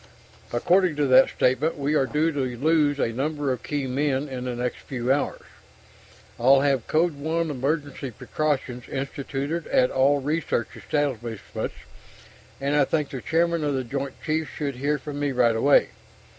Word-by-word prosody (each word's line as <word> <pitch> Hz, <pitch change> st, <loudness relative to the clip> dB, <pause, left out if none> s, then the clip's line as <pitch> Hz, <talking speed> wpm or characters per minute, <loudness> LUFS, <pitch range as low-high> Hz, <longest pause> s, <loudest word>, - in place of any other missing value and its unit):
According 175 Hz, +7 st, +3 dB
to 145 Hz, -1 st, +1 dB
that 130 Hz, 0 st, +6 dB
statement, 135 Hz, +6 st, +1 dB
we 145 Hz, +1 st, 0 dB
are 135 Hz, -3 st, +2 dB
due 155 Hz, +3 st, +1 dB
to 145 Hz, -, -4 dB, 0.2 s
lose 150 Hz, +1 st, +2 dB
a 115 Hz, -4 st, 0 dB
number 145 Hz, +2 st, -1 dB
of 125 Hz, -2 st, -3 dB
key 145 Hz, 0 st, -2 dB
men 135 Hz, +2 st, 0 dB
in 130 Hz, -2 st, -5 dB
the 125 Hz, -1 st, -3 dB
next 125 Hz, 0 st, -3 dB
few 130 Hz, 0 st, -1 dB
hours. 145 Hz, -, -2 dB, 1.0 s
I'll 135 Hz, +3 st, +6 dB
have 135 Hz, -4 st, +1 dB
Code 165 Hz, +2 st, +2 dB
One 160 Hz, +2 st, -1 dB
emergency 140 Hz, 0 st, -2 dB
precautions 125 Hz, 0 st, -3 dB
instituted 140 Hz, +4 st, -3 dB
at 125 Hz, 0 st, +3 dB
all 140 Hz, +2 st, +3 dB
research 145 Hz, -4 st, -1 dB
establishments, 120 Hz, -7 st, -3 dB, 0.8 s
and 140 Hz, +2 st, 0 dB
I 145 Hz, -, +5 dB
think 150 Hz, +1 st, -1 dB
the 130 Hz, -, -5 dB
chairman 170 Hz, +1 st, +1 dB
of 145 Hz, -2 st, 0 dB
the 130 Hz, -, -1 dB
Joint 135 Hz, +2 st, -4 dB
Chiefs 155 Hz, 0 st, -1 dB
should 140 Hz, -4 st, -4 dB
hear 145 Hz, +3 st, 0 dB
from 145 Hz, +1 st, -7 dB
me 145 Hz, -1 st, 0 dB
right 120 Hz, -2 st, +3 dB
away. 140 Hz, +6 st, +4 dB
140 Hz, 165 wpm, -25 LUFS, 130-150 Hz, 1.0 s, that